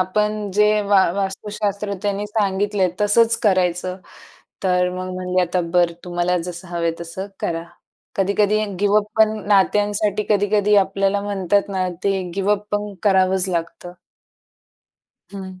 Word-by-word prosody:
आपण 210 +2 -1
जे 210 0 +4
वा 200 -2 +5
वास्तुशास्त्र 200 +1 -3
त्यांनी 205 0 -1
सांगितलंय 205 -2 0
तसंच 225 +2 +4
करायचं. 185 -2 +1 0.7
तर 180 -1 +2
मग 185 0 -5
म्हणाले, 185 0 -1
"आता 180 +1 0
बरं 175 -1 +3
तुम्हाला 175 0 0
जसं 175 +1 -7
हवं 170 -1 -4
आहे 165 -1 +1
तसं 170 +3 -6
करा." 165 0 -2 0.5
कधी-कधी 205 +2 +2 0.2
गिव 205 0 +2
अप 210 - -2
पण 220 0 +5 0.2
नात्यांसाठी 205 +1 +2
कधी-कधी 205 0 +3
आपल्याला 195 0 +2
म्हणतात 200 0 0
ना 185 -2 -1 0.2
ते 195 -1 +1
गिव 195 +1 0
अप 210 0 -3
पण 205 0 -2
करावंच 190 -1 +3
लागतं. 175 0 -4 1.4
हं. 190 -2 -8
195 Hz, 135 wpm, -21 LUFS, 185-205 Hz, 1.4 s, वा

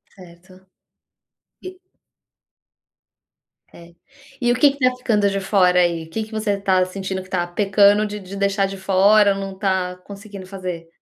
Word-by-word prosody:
Certo, 185 +1 -17 0.9
e 370 0 -10 1.9
É, 170 0 -15 0.5
e 240 -1 0
o - - -2
que 280 +3 +4
que 280 - -13
tá 255 -1 +2
ficando 210 -5 +1
de 195 0 -3
fora, 185 -2 +3
aí? 170 -2 0
O - - -17
que 220 +7 -3
que 215 - -13
você 215 -2 -1
tá 190 -2 +2
sentindo 190 0 -5
que 185 - -15
tá 175 -2 -1
pecando 200 +3 +3
de 210 0 -6
de 195 0 -10
deixar 200 0 +1
de 195 0 -6
fora 200 +2 +4
ou 195 - -6
não 195 -1 -7
tá 185 -2 -1
conseguindo 200 -1 -10
fazer? 180 -4 -7
195 Hz, 170 wpm, -20 LUFS, 185-210 Hz, 1.9 s, que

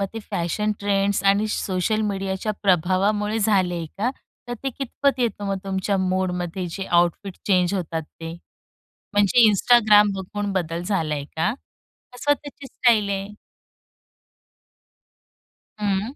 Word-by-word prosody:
मग 195 - +1
ते - - -3
fashion 195 +5 -1
trends 200 -1 +1
आणि 200 +2 +4
सोशल 190 +3 -1
मीडियाच्या 195 +1 -2
प्रभावामुळे 200 +4 +2
झालंय 185 -6 +1
का, 235 +5 +1 0.4
तर 245 - -2
ते 270 - -1
कितपत 275 0 0
येतं 215 -4 -1
मग 195 0 -1
तुमच्या 195 +1 -1
मुडमध्ये 185 -1 -1
जे 195 +2 -5
आउटफिट 175 +2 +1
चेंज 185 -1 +2
होतात 165 -3 -3
ते? 165 +1 -9 0.8
म्हणजे 205 +3 +5
Instagram 210 -1 +5
बघून 200 +2 -4
बदल 170 -2 -2
झालाय 160 -7 -1
का 160 +7 +1 0.6
कसं 290 +4 +2
त्याची 285 -1 -11
स्टाईल 220 -6 +2
आहे? 195 0 -2 2.5
हं. 205 +6 -1
195 Hz, 125 wpm, -23 LUFS, 180-210 Hz, 2.5 s, म्हणजे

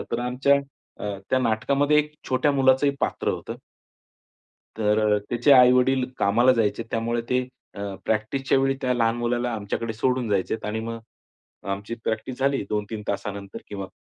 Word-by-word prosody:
अ, - - -3
तर 115 - 0
आमच्या 140 +3 +3 0.7
त्या 130 - +3
अ, - - -1
नाटकामध्ये 140 +6 +2
एक 150 0 -1
छोट्या 130 +3 +2
मुलाचंही 135 +1 +3
पात्र - - -1
होतं. - - -3 1.2
तर 105 -1 +2 0.2
अ, - - +2
त्याचे 120 +4 +4
आई-वडील 125 0 +5
कामाला 120 +6 +4
जायचे. 110 -2 0
त्यामुळे 115 +1 -1
ते 125 0 +1 0.3
अ, 100 -1 -4
प्रॅक्टिसच्यावेळी 135 +5 +1
त्या 125 -1 +1
लहान 115 -1 +1
मुलाला 120 +1 -1
आमच्याकडे 110 +2 -3
सोडून 125 +1 0
जायचे 100 +1 0
आणि 110 +1 -2
मग 115 0 -5 0.7
आमची 100 +4 -4
प्रॅक्टिस 110 +3 -3
झाली, 135 0 +1
2-3 105 0 -3
तासानंतर 100 -1 -4
किंवा 100 -2 -5
120 Hz, 150 wpm, -24 LUFS, 110-130 Hz, 1.2 s, आई-वडील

